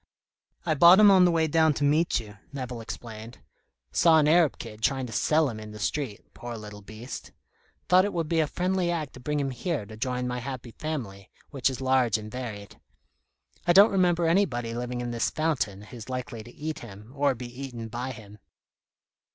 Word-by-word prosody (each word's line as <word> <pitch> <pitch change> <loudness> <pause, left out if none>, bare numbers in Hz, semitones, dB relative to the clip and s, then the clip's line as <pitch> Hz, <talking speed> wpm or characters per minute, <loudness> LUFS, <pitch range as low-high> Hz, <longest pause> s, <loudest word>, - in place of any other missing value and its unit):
"I 160 - +2
bought 170 +6 +8
him 210 -1 +8
on 185 -2 +6
the 175 - +4
way 165 -1 +2
down 160 -1 +3
to - - -2
meet 150 +2 +2
you," 105 -2 -11
Nevill 125 -4 -5
explained. 115 0 -8 0.5
"Saw 165 - +5
an 150 -1 +4
Arab 160 -1 +4
kid 110 -2 -9
trying 135 +2 +1
to 115 - -8
sell 155 0 +2
him 110 -4 -5
in 105 0 -9
the - - -8
street, 125 -2 -4
poor 120 -1 -7
little 105 -1 -10
beast. 110 +5 -9 0.6
Thought 185 +1 +5
it 205 - -2
would 165 -3 -2
be 165 +1 +1
a 155 - +2
friendly 180 +2 0
act 160 -5 -2
to - - -11
bring 150 +3 -2
him 135 -1 -1
here 145 - -3
to 110 - -11
join 125 +2 -2
my 125 0 -3
happy 125 -1 -6
family, 115 -11 -6 0.2
which 135 -2 +1
is 130 0 -6
large 130 -4 +2
and 110 0 -8
varied. 110 -6 -7 0.9
I 175 - +6
don't 200 +4 +8
remember 175 -3 +2
anybody 140 -10 +1
living 120 +1 -4
in 120 -1 -3
this 115 -1 0
fountain 135 -11 -1
who's 115 +2 -10
likely 125 -2 -5
to 120 - -12
eat 155 +3 -5
him, 105 0 -11
or 140 -2 +2
be 125 +2 -8
eaten 120 -4 -6
by 120 +3 -4
him." 105 -4 -12
130 Hz, 200 wpm, -27 LUFS, 115-160 Hz, 0.9 s, bought